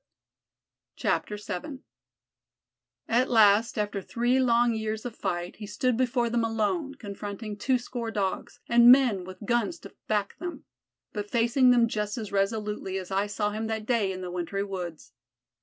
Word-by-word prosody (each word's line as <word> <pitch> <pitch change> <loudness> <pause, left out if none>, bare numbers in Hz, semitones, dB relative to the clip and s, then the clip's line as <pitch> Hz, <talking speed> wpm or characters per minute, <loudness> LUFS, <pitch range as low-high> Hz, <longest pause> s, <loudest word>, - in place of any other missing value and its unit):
VII 210 - -3 1.2
At 245 +3 +2
last 220 0 +5
after 205 -1 -1
three 240 +6 +1
long 240 -2 +3
years 220 0 -3
of 240 -2 -5
fight 175 0 -3
he 210 - -7
stood 250 +4 0
before 245 0 +1
them 235 0 0
alone, 230 - -1
confronting 205 -2 -6
twoscore 245 +1 -1
Dogs, 195 -3 -3
and 235 0 +8
men 250 -8 +5
with 185 +3 -9
guns 240 +8 0
to - - -11
back 210 -2 -1
them 335 -4 -6 0.5
but 205 0 -4
facing 240 +3 +3
them 240 -2 +5
just 210 -1 -3
as 215 -3 -5
resolutely 200 -1 -1
as 185 0 -6
I 195 +2 +1
saw 210 0 -1
him 220 +1 -3
that 220 -1 -3
day 220 -5 +1
in 185 0 -6
the 180 -1 -5
wintry 180 +3 -2
woods. 180 -5 -6
220 Hz, 155 wpm, -27 LUFS, 200-240 Hz, 1.2 s, and